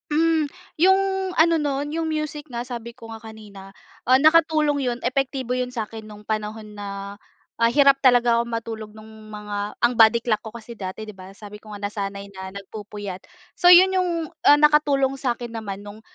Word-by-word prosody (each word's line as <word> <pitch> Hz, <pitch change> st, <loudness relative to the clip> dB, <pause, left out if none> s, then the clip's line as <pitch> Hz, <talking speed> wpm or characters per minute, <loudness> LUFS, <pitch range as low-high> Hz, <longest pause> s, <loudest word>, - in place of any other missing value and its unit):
Hmm. 315 Hz, 0 st, +2 dB, 0.3 s
Yung 380 Hz, +2 st, +5 dB, 0.4 s
ano 330 Hz, +1 st, +5 dB
nun, 290 Hz, 0 st, -2 dB
yung 325 Hz, 0 st, -2 dB
music 305 Hz, -1 st, -4 dB
nga 240 Hz, -1 st, -5 dB
sabi 235 Hz, -2 st, -7 dB
ko 225 Hz, 0 st, -12 dB
nga 225 Hz, -, -10 dB
kanina, 210 Hz, -3 st, -12 dB, 0.4 s
ah, 255 Hz, +1 st, +6 dB
nakatulong 310 Hz, -1 st, +3 dB
yun, 245 Hz, -2 st, -1 dB
epektibo 260 Hz, -1 st, -1 dB
yun 250 Hz, 0 st, -2 dB
sa'kin 225 Hz, -2 st, -6 dB
nung 210 Hz, 0 st, -13 dB
panahon 215 Hz, 0 st, -4 dB
na, 200 Hz, -1 st, -7 dB, 0.5 s
ah, 230 Hz, -, +5 dB
hirap 275 Hz, +1 st, +4 dB
talaga 245 Hz, -2 st, +4 dB
ako -, -, -2 dB
matulog, 225 Hz, -2 st, -5 dB
nung 215 Hz, 0 st, -14 dB
mga 210 Hz, -1 st, -6 dB
ang 240 Hz, +1 st, +2 dB
body 225 Hz, 0 st, +5 dB
clock 215 Hz, -3 st, 0 dB
ko 220 Hz, -, -8 dB
kasi 235 Hz, +1 st, -10 dB
dati, 200 Hz, 0 st, -7 dB
di 215 Hz, -, -9 dB
ba 185 Hz, -1 st, -12 dB
sabi 210 Hz, 0 st, -11 dB
ko 215 Hz, -, -15 dB
nga 205 Hz, -, -11 dB
nasanay 200 Hz, -1 st, -5 dB
na 190 Hz, 0 st, -7 dB
nagpupuyat. 200 Hz, -1 st, -8 dB, 0.3 s
So 355 Hz, -, +4 dB
yun 370 Hz, +2 st, +8 dB
yung 365 Hz, -1 st, +1 dB, 0.3 s
ah, 290 Hz, -, +7 dB
nakatulong 290 Hz, -3 st, +3 dB
sa'kin 240 Hz, -2 st, -3 dB
naman 205 Hz, -3 st, -6 dB
nung, 205 Hz, +1 st, -11 dB
230 Hz, 180 wpm, -23 LUFS, 210-280 Hz, 0.5 s, yun